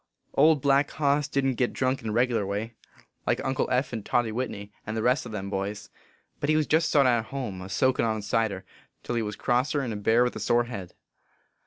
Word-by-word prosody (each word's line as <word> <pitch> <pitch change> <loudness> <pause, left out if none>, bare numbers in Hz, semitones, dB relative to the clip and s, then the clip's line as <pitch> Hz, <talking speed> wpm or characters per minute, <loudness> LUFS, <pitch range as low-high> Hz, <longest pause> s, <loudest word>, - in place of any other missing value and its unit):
Old 150 -1 +4
Black 140 0 +3
Hoss 145 -1 +1
didn 140 -2 +1
t - - -4
git 125 - +1
drunk 130 +1 0
in 110 - -4
a - - -2
regerlar 115 -3 +1
way, 105 +4 -3 0.5
like - - +2
Uncle 135 0 0
Eph 130 +1 0
and 110 -3 -4
Toddy 120 0 +1
Whitney, 105 -4 -4
and 110 +1 -4
the 110 - -1
rest 125 +1 +2
o - - -8
them 100 -2 -5
boys. 100 +2 -4 0.5
But 145 - -2
he 155 0 +4
jest 160 +2 +2
sot 140 -3 +4
at 120 -3 +3
home, 110 -7 -5
a 95 - -8
soakin 130 +9 +2
on 110 -2 -1
cider, 105 -2 -1 0.4
till - - -3
he 120 - +1
was 105 -1 -4
crosser 130 +6 +1
n 120 -4 -3
a - - -4
bear 110 +4 +3
with 125 - -1
a - - -4
sore 120 0 +2
head. 100 -7 -8
120 Hz, 225 wpm, -27 LUFS, 105-135 Hz, 0.5 s, Old